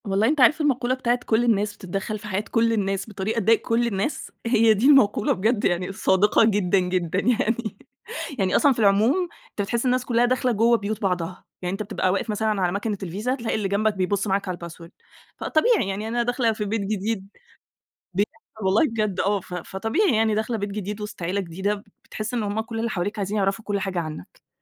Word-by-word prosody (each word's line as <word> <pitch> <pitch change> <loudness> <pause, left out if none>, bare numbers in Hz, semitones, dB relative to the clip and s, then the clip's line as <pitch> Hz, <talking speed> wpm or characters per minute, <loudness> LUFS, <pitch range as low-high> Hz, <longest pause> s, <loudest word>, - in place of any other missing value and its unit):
والله 200 +2 +2
أنت 295 -1 +2
عارف 310 +5 +5
المقولة 255 -4 +1
بتاعة 245 -1 0
كُلّ 225 +1 +2
الناس 210 -3 +1
بتتدخّل 195 +3 -4
في 210 - -9
حياة 195 0 -1
كُل 230 0 +3
الناس 195 -1 -1
بطريقة 215 +2 -2
تضايق 225 +2 +3
كُل 235 +1 +1
الناس، 210 +6 -3
هي 230 -1 +5
دي 215 +6 +2
المقولة 260 -8 +5
بجد 215 +4 0
يعني 180 +1 0
صادقة 195 +3 +3
جدًا، 200 -3 +2
جدًا 180 -1 -1
يعني. 230 -1 0 0.6
يعني 190 -1 +1
أصلًا 285 - +5
في 235 - -7
العموم 225 - +3 0.2
أنت - - -4
بتحس 235 +5 -1
الناس 255 0 +1
كُلّها 240 0 +3
داخلة 255 +1 +1
جوه 230 +2 +4
بيوت 215 0 -4
بعضها، 180 -3 -2 0.2
يعني 180 -1 -2
أنت 205 +2 -3
بتبقى 200 -3 -1
واقف 195 +4 -2
مثلًا 215 -1 0
على 180 -1 +2
مكنة 205 +2 -2
الVisa، 205 +9 -2
تلاقي 230 -3 -2
اللي 210 -2 -1
جنبَك 210 +2 +1
بيبُص 200 +2 0
معاك 195 0 0
على 180 - -3
الpassword. 170 0 -9 0.5
فطبيعي 360 - +2
يعني 205 +3 -3
أنا 240 +1 0
داخلة 245 -1 +1
في 210 -1 -3
بيت 215 +1 -1
جديد، 200 0 -2 0.9
بيحصل 215 +2 -4
والله 190 +3 +4
بجد، 215 -4 -1
آه 200 0 +1
ف 180 - -10
فطبيعي 225 - 0
يعني 220 -1 +2
داخلة 220 +2 -1
بيت 205 -1 -3
جديد 205 +1 -5
وسط 210 -3 -7
عيلة 185 +4 -1
جديدة، 190 +3 -2
ب 200 - -10 0.2
بتحس 215 +3 -5
إن 235 - 0
هُم 205 +1 -1
كُل 225 0 -5
اللي 230 +1 -1
حواليك 205 +3 -3
عايزين 200 +1 -2
يعرفوا 200 +2 0
كُلّ 205 -1 -1
حاجة 190 -2 -2
عنَّك. 155 - -9
210 Hz, 205 wpm, -24 LUFS, 195-230 Hz, 0.9 s, عارف